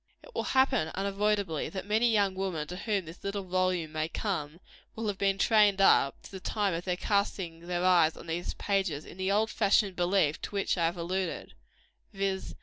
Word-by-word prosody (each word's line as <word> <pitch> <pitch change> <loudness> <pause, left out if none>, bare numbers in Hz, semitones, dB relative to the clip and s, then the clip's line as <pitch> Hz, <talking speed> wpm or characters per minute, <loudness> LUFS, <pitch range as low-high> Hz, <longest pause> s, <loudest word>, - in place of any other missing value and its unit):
It - - -15
will - - -2
happen, 260 - +3
unavoidably, 200 -3 0
that 190 -1 -6
many 220 +3 +2
young 200 -3 +2
women 185 -5 -3
to 180 - -5
whom 200 -1 -1
this 165 +2 -12
little 200 0 -3
volume 185 -3 0
may 155 0 -2
come, 170 -6 -3 0.4
will 225 - -4
have 205 -2 -2
been 195 -1 +2
trained 210 -2 +4
up, 140 -7 +4
to - - -12
the 190 - -7
time 205 0 -1
of 170 +1 -4
casting 180 -5 -1
their 180 0 -1
eyes 170 -3 +4
on - - -10
these 170 +1 -3
pages, 190 -7 -1
in - - -12
the 190 +1 0
old 215 +2 +2
fashioned 200 -2 +2
belief 175 -4 +1
to - - -5
which 200 - +1
I 170 -3 +1
have 170 +2 -3
alluded 180 +1 -3 0.6
viz. 195 -1 -2
190 Hz, 195 wpm, -29 LUFS, 175-200 Hz, 0.6 s, trained